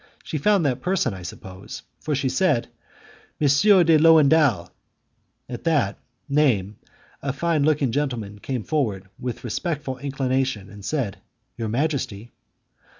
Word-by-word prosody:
She 155 - -4
found 195 +2 +3
that 130 -2 0
person, 180 - 0
I 95 - -8
suppose, 95 +3 -9 0.2
for 150 - -2
she 135 0 0
said, 145 -4 +1 0.7
"Monsieur 175 +7 +5
de 160 -2 +5
Lowendal!" 150 - +5 0.8
At 120 -1 -7
that 145 -11 +1 0.3
name, 125 -9 +1 0.4
a 140 - -1
fine 160 +3 0
looking 145 -5 +2 0.2
man 105 -2 -8
came 125 0 -4
forward 105 -11 -1
with 125 -1 -5
respectful 135 - -3
inclination, 130 -6 -2
and 100 -1 -12
said, 120 -6 -2 0.4
"Your 115 -2 -3
majesty?" 120 -4 -2
135 Hz, 130 wpm, -23 LUFS, 110-155 Hz, 0.8 s, Monsieur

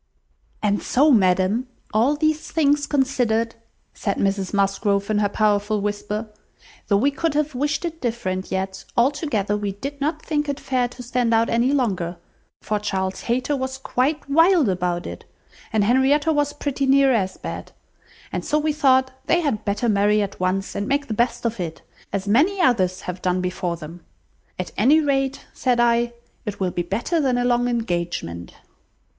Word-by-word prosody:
"And 205 -1 +1
so, 290 +4 +3
ma'am, 195 +2 +3 0.3
all 240 +7 +3
these 310 +1 0
thing 295 -3 +3
considered," 260 -6 0 0.4
said 200 - -2
Mrs 195 -1 0
Musgrove, 200 0 +1
in 210 - +2
her 205 -1 +2
powerful 210 0 +1
whisper, 210 +2 -3 0.6
"though 200 - +3
we 275 +7 +2
could 325 +1 -1
have 300 0 0
wished 295 +6 -1
it 330 -1 -5
different, 190 -6 -3
yet, 190 0 -3
altogether, 235 - +1
we 205 -1 -2
did 280 +8 -7
not 305 +2 0
think 295 -2 -1
it 285 0 -2
fair 255 -2 0
to 250 +1 -10
stand 240 -1 +1
out 225 +1 +2
any 235 +3 +2
longer, 190 -11 0 0.5
for 210 -1 -1
Charles 190 -2 -2
Hayter 255 +4 +1
was 260 0 -3
quite 275 +3 -1
wild 325 - +4
about 180 -1 -1
it, - - -7 0.5
and 215 -2 +2
Henrietta 270 +7 +3
was 290 -1 +1
pretty 285 -2 -2
near 270 0 +5
as 190 -5 0
bad; - - -7 0.6
and - - -3
so 300 - +1
we 305 0 +1
thought 260 -3 +3 0.2
they 345 - +3
had 255 -10 -1
better 205 +4 0
marry 210 0 +3
at 200 - -6
once, 185 +1 -1
and 200 +1 -3
make 285 +1 +1
the - - -1
best 235 +2 0
of 230 -2 -1
it, 165 -3 -5 0.3
as 200 0 -3
many 310 - +3
others 190 - +2
have 180 0 -6
done 180 0 +1
before 180 -1 -2
them. 165 +2 -10 0.5
At 185 - -4
any 275 +9 +5
rate, 275 -2 0
said 250 -2 +1
I, 235 0 +3 0.3
it 210 -3 -5
will 185 -2 0
be 175 - -1
better 225 - -1
than 260 -3 +1
a 245 - +1
long 245 0 +2
engagement." 175 - -3
235 Hz, 175 wpm, -22 LUFS, 200-280 Hz, 0.6 s, near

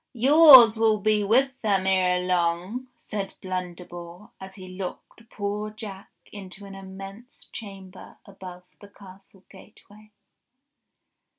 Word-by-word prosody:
''Yours 260 -3 +8
will 220 -1 +2
be 210 0 +1
with 260 +6 +1
them 195 -3 0
ere 185 -1 +1
long," 180 +7 -2
said 200 -4 -6
Blunderbore 180 0 -8
as 190 0 -11
he 185 -2 -11
locked 195 +4 -9
poor 205 +1 -4
Jack 210 -2 -10 0.2
into 200 0 -9
an 195 - -11
immense 195 +4 -11
chamber 195 -3 -11
above 185 -2 -12 0.2
the 205 - -14
castle 195 -1 -18
gateway. 215 +1 -18
195 Hz, 115 wpm, -24 LUFS, 185-215 Hz, 0.2 s, Yours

